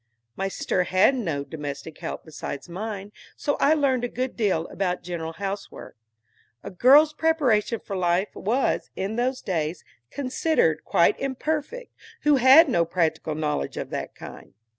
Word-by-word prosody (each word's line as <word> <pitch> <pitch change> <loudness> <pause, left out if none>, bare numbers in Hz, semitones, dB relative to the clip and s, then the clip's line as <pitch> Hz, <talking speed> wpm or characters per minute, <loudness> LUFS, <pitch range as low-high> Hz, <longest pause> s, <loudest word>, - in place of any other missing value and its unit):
My 195 - -2
sister 185 -1 -1
had 185 +9 +4
no 165 - -2
domestic 145 0 -7
help - - -6
besides 155 -2 -7
mine, 200 +2 -6 0.2
so 285 - -1
I 305 +3 +4
learned 265 -5 +1
a - - +1
good 255 +2 -4
deal 190 -8 0
about 180 -2 -2
general 165 -2 -5
housework. 200 +2 -6 0.7
A - - -7
girl's 285 - +6
preparation 270 -9 +1
for 200 - -6
life 180 +2 0
was, 240 +7 0
in 195 +3 -3
those 255 +2 -1
days, 165 -2 -2 0.3
considered 255 - 0
quite 170 - +3
imperfect, 305 - -3 0.3
who 295 -1 +4
had 265 +6 +8
no 175 -11 +2
practical 165 -2 -1
knowledge 150 - -2
of - - -5
that - - -5
kind. - - -11
200 Hz, 150 wpm, -25 LUFS, 170-265 Hz, 0.7 s, had